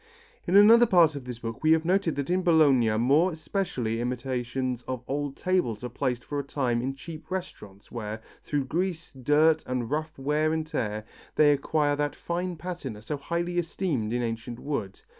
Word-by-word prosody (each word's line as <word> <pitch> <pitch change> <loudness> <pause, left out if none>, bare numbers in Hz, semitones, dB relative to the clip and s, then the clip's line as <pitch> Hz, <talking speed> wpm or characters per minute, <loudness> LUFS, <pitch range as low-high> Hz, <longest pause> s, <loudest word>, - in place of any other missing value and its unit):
In 180 - +2
another 230 +4 +8
part 170 -6 +5
of 140 -3 -7
this 125 -2 -6
book 115 -1 -6
we 155 0 +5
have 160 0 +1
noted 185 -2 +1
that 140 +4 -2
in 185 +1 +2
Bologna 150 -9 +4
more 145 +10 +3
especially 155 - -2
imitations 125 0 -2
of 130 -2 -4
old 145 0 -2
tables 180 - 0
are 125 - -3
placed 125 0 -2
for 145 - -3
a - - -2
time 130 -4 -1
in 135 +2 -3
cheap 155 +2 -10
restaurants 105 - -7
where, 110 -2 -5 0.2
through 145 -2 -1
grease, 170 +2 -2
dirt 150 +4 +3
and 125 -2 -2
rough 155 +1 -2
wear 150 +3 +1
and 160 -1 -1
tear, 110 -8 -3 0.3
they 150 -1 +6
acquire 145 +1 +1
that 145 0 -1
fine 175 +1 -3
patina 160 -10 -6
so 150 - -3
highly 170 +4 -2
esteemed 160 - -2
in 120 0 0
ancient 115 +1 -4
wood. 120 -9 -4
145 Hz, 180 wpm, -27 LUFS, 125-165 Hz, 0.3 s, another